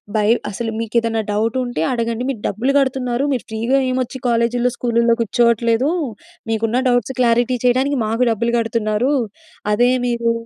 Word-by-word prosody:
By 210 -1 +2 0.2
అసలు 225 +3 -4
మీకు 230 0 -5
ఏదైనా 225 -1 -1
డౌట్ 220 +3 0
ఉంటే 245 -9 -3
అడగండి. 235 -1 -2
మీరు 260 -5 -3
డబ్బులు 235 +7 0
గడుతున్నారు 260 -2 0
మీరు 255 -4 -1
ఫ్రీ‌గా 230 +5 0
ఏం 255 0 -1
ఒచ్చి 260 +2 -8
కాలేజ్‌లో 240 +1 +1
స్కూలుల్లో 235 -1 +2
కూర్చోవట్లేదు. 235 +3 +2 0.6
మీకున్న 225 +3 0
డౌట్స్ 245 +1 +1
క్లారిటీ 240 +1 +2
చేయడానికి 260 +3 +2
మాకు 225 +3 +1
డబ్బులు 235 +2 -1
గడుతున్నారు. 225 +2 0 0.6
అదే 245 +4 +3 0.2
మీరు 235 -1 0
235 Hz, 150 wpm, -19 LUFS, 225-250 Hz, 0.6 s, అదే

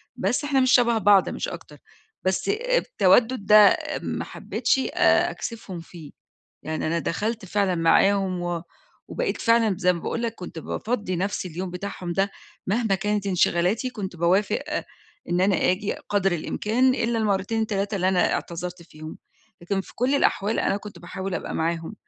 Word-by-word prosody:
بس 250 - 0
إحنا 285 -2 +1
مش 255 0 +3
شَبه 235 -2 +4
بعض 205 -3 +4
مش - - -4
أكتر، - - -9 0.5
بس 185 - 0
اب - - +1
التَوَدُّد 250 - +3
ده 210 0 +8
آمم - - -3
ما - - -4
حبِّتش - - -1
آآ - - +3
أكسِفهم 215 -6 -6
فيه. 165 -3 -12 0.5
يعني 155 0 -3
أنا 165 +2 0
دخلت 215 +6 -2
فعلًا 195 0 0
معاهم 185 +2 +2
و 175 -1 -3 0.5
وبقيت - - -2
فعلًا 230 -1 +3
ب 190 - -2
زي 180 -1 +3
ما 170 - -5
باقول 235 - -3
لك 230 -2 -2
كنت 180 -5 -8
بافضّي 205 +2 -3
نَفْسي 190 +1 -2
اليوم 180 +2 -5
بتاعهم 180 -1 -5
ده 195 +3 +1 0.4
مهما 215 0 +1
كانت 205 +1 -1
انشغالاتي 185 +5 +1
كنت 195 -7 -6
باوافق 180 +5 +2 0.7
إن 175 +1 +1
أنا 190 0 +3
آجي 195 +3 -1 0.2
قدر 195 -2 +2
الإمكان 225 +9 +1
إلّا 230 -1 0
المرتين، 215 +1 0
3 205 0 -2
اللي 185 -1 +1
أنا 185 -2 +2
اعتذرت 175 +1 -5
فيهم، 155 -1 -11 0.4
لكن 195 +3 -1
في - - -12
كل 255 +3 +1
الأحوال 220 -5 +1
أنا - - +1
كنت 205 -3 -9
باحاول 185 +2 -5
أبقى - - -4
معاهم. 165 +4 -2
195 Hz, 170 wpm, -24 LUFS, 180-225 Hz, 0.7 s, ده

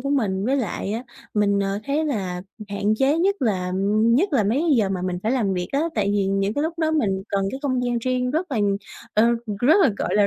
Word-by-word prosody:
của 275 +2 -3
mình 200 -9 0
với 265 +4 +1
lại 215 -4 -2
á, 230 +3 -3 0.3
mình, 200 -1 +2
ờ, 195 0 -1
thấy 290 +5 0
là 190 -11 -2 0.3
hạn 205 +1 0
chế 275 +4 +3
nhất 390 +4 +2
là 185 -6 0 0.3
nhất 265 - +3
là 240 -7 +3
mấy 220 +7 +1
cái 320 -4 +3
giờ 215 -4 +2
mà 190 -2 -2
mình 180 -1 -2
phải 220 - 0
làm 225 -7 +1
việc 180 -1 -3
á, 280 - +2
tại 200 -2 +1
vì 200 -1 +1
những 195 +1 0
cái 290 - 0
lúc 325 +2 -3
đó 320 -1 +1
mình 200 -12 0
cần 200 -2 0
cái 265 - -5
không 255 -3 0
gian 240 -1 0
riêng 250 +1 -1
rất 325 +5 -2
là, 255 - -1 0.6
ờ, 215 - +5 0.4
rất 310 +11 +5
là, 275 - +5
gọi - - -1
là, 205 -1 +4
230 Hz, 250 wpm, -23 LUFS, 200-280 Hz, 0.6 s, ờ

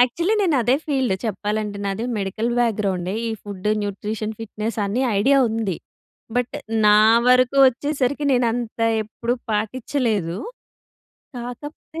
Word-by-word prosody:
Actually 335 - +1
నేను 335 -7 +2
అదే 245 +3 +3
field 265 -9 +1
చెప్పాలంటే 210 0 -2
నాది 200 +3 -2
మెడికల్ 205 +4 -2
బ్యాక్‌గ్రౌండే. 200 -5 0
ఈ - - -2
ఫుడ్, 205 -1 -5
న్యూట్రిషన్, 210 +2 -3
ఫిట్‌నెస్ 220 0 -4
అని 210 +6 -1 0.2
ఐడియా 275 +7 +4
ఉంది. 220 -5 -2 0.6
బట్ 245 0 -1 0.3
నా 210 0 +7 0.3
వరకు 255 +1 +4
వచ్చేసరికి 280 +2 0
నేను 245 -1 +3
అంత 235 -1 -5 0.2
ఎప్పుడు 230 +3 -3 0.2
పాట్టిచలేదు. 215 - -1 1.0
కాకపోతే 290 +6 -8
225 Hz, 120 wpm, -22 LUFS, 205-255 Hz, 1.0 s, నా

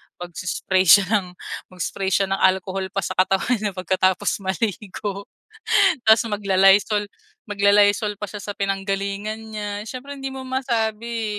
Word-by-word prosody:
magsi-spray 185 +1 -2
siya 200 +4 +8 0.2
ng 180 -1 -11 0.4
mag-spray 190 +2 -3
siya 195 +1 +2
ng 195 - 0
alcohol 190 0 +1
pa 195 0 -3
sa - - -3
katawan 195 +6 +2
niya 205 -3 -3
pagkatapos 185 +1 0
maligo 200 +1 -4 0.8
tapos 220 +1 +5
magla-Lysol 205 0 +3 0.4
magla-Lysol 205 +1 +3
pa 210 - -4
siya 205 0 -8
sa 205 - -6
pinanggalingan 195 +2 -2 0.2
niya 210 -1 -4 0.2
siyempre 275 +4 -8
hindi 270 - -6
mo 265 - -6
masabi 230 -4 -2
200 Hz, 130 wpm, -22 LUFS, 190-215 Hz, 0.8 s, siya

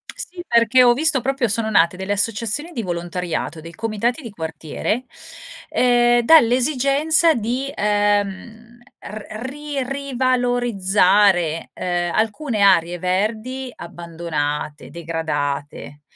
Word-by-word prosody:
Sì, 350 0 -7
perché 235 +2 +4
ho 240 -1 +6
visto 285 -1 +1
proprio 270 -1 0
sono 220 +1 -1
nate 170 -4 +3
delle 190 +2 -3
associazioni 230 - -2
di 235 - -4
volontariato, 175 -3 -4
dei 165 +1 -11
comitati 225 - -2
di 230 -5 -8
quartiere, 165 - -4 0.6
ehm, 240 -1 +3
dall'esigenza 280 +4 +4
di, 250 +4 -3
ehm, 205 +3 -1 0.2
r 210 0 -8 0.2
ri 290 0 -5
rivalorizzare, 240 - +1
ehm, 175 -1 -2
alcune 225 +2 -1
aree 175 -3 +3
verdi 220 +8 -2
abbandonate, 160 -4 -5
degradate. 150 -3 -4
215 Hz, 105 wpm, -20 LUFS, 175-250 Hz, 0.6 s, ho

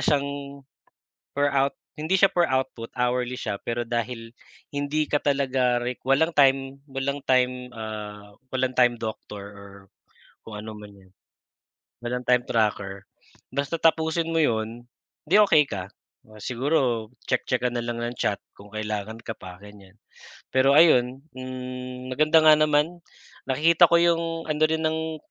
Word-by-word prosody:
siyang, 140 -1 -1 0.7
per 145 0 +2
out 140 0 +1 0.2
hindi 160 +5 +1
siya 195 - +7
per 175 -2 +2
output, 130 -3 -2
hourly 125 0 -1
siya, 100 - -3
pero 120 0 -2
dahil 115 0 -3 0.4
hindi 145 +2 -1
ka - - -1
talaga 130 -3 +1
req 120 +1 -4
walang 135 +6 +3
time 135 -1 +3 0.2
walang 135 +1 -3
time, 125 -1 +1
ah, 105 -2 -7 0.2
walang 130 0 -1
Time 125 -1 +4
Doctor, 110 -2 -6
or 100 0 -12 0.7
kung 110 - -9
anuman 105 -1 -9
'yan. 95 -1 -20 0.9
Walang 125 +1 -3
time 125 -1 +4
tracker. 100 -3 -1 0.5
Basta 140 +4 -1
tapusin 160 0 +2
mo 165 - +1
'yon, 115 -2 -1 0.4
di 185 +7 +5
okey 160 -7 +5
ka. 95 -1 -4 0.4
O 110 0 -15
siguro, 125 -2 0 0.2
check-check 125 0 0
ka - - 0
na 120 - -1
lang 120 0 -4
ng 120 +1 -3
chat 100 -4 -1 0.2
kung 100 +1 -15
kailangan 110 0 -4
ka 115 -1 -6
pa, 90 -3 -11
ganyan. 100 0 -15 0.5
Pero 135 +2 +4
ayun, 135 -4 +5
hmm, 130 0 -7
maganda 155 +3 +4
nga 155 - +9
naman. 155 +3 +2 0.5
Nakikita 165 +6 +5
ko 170 - +5
'yong, 170 -1 +3 0.2
ano 155 0 -1
rin 160 0 -1
ng 160 0 -1
125 Hz, 145 wpm, -25 LUFS, 115-145 Hz, 0.9 s, nga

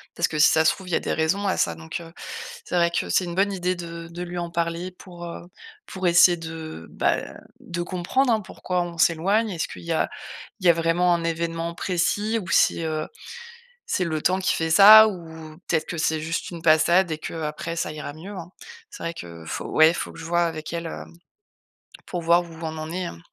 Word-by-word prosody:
parce 170 - +2
que 155 - -4
si 150 - +7
ça 160 0 +3
se - - +6
trouve, 190 -2 -12
il - - -6
y - - +2
a - - +2
des - - -2
raisons 185 +6 0
à 190 - +1
ça. 85 - +1
Donc, 80 - -6
heu, 165 -1 -11 0.5
c'est - - -4
vrai 170 -1 +3
que 170 - -2
c'est 185 - +3
une 170 -1 -5
bonne 200 +2 +2
idée 180 -1 -1
de 170 -1 -7
de 170 +1 -8
lui 175 0 -6
en 170 -1 -3
parler 170 +2 -2
pour, 175 -1 -11
heu, 170 - -7 0.4
pour 190 -1 -6
essayer 175 +1 +6
de, 160 - -8
bah, - - +1 0.4
de 175 0 -5
comprendre 185 +9 0
hein, 220 - +1
pourquoi 180 -2 -3
on 170 -1 -8
s'éloigne. 195 +8 +2
Est-ce 165 -3 -2
qu'il - - -10
y 170 -1 -2
a - - +1 0.5
il 185 - 0
y - - +8
a 170 - +8
vraiment 170 +2 +2
un 170 -1 -1
événement 165 0 -2
précis 205 +6 0
ou 175 - -9
si, 170 - +3
heu, 155 -1 -2 0.8
c'est 185 - 0
le 155 -2 -2
temps 185 +4 +2
qui 190 - +1
fait 160 0 -1
ça 215 +5 +10
ou 160 -5 -8
peut-être 160 -2 +1
que 170 - -5
c'est 160 0 +1
juste 165 +2 -3
une 170 -2 -7
passade 165 +3 +4
et 155 - -2
qu'après 160 +1 -4
ça 155 - -2
ira 150 -1 -6
mieux, 170 +7 -10
hein. 175 -1 -8 0.4
C'est - - -10
vrai 165 0 -3
que 85 - -10
faut - - -5
ouais, 160 +2 +5
faut 170 - -4
que - - -12
je 165 - -8
vois 170 +1 +2
avec 160 0 -5
elle, 170 0 -3
heu, - - -6 1.0
pour 175 - -4
voir 170 +1 +4
où 170 - -12
on 160 -1 -4
en 155 +1 -5
est, 180 +1 -3
hein. 85 - -7
170 Hz, 235 wpm, -24 LUFS, 160-180 Hz, 1.0 s, ça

